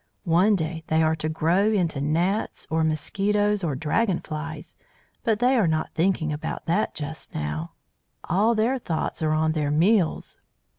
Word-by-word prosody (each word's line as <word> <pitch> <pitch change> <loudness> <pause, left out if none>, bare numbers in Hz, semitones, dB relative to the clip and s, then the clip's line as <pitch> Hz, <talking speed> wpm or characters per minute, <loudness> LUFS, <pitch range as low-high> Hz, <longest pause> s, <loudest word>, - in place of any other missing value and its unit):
One 185 +5 +4
day 160 -2 -3
they 160 0 +2
are 160 0 +2
to 155 - -2
grow 170 +6 +2
into 170 -9 0
gnats 170 +8 -1
or 160 0 +2
mosquitoes 200 +6 0
or 150 -5 -1
dragon 170 - 0
flies, 155 0 -7 0.5
but 220 -2 +2
they 250 +4 +3
are 220 -8 +3
not 155 0 -1
thinking 165 -3 +1
about 150 - -5
that 200 +6 0
just 155 +1 -6
now, 75 +2 -4 0.5
all 210 +7 +2
their 235 +5 +1
thoughts 165 -8 -3
are 155 -1 +1
on 155 0 +2
their 150 -2 -1
meals. 170 +4 +1
165 Hz, 160 wpm, -25 LUFS, 155-205 Hz, 0.5 s, One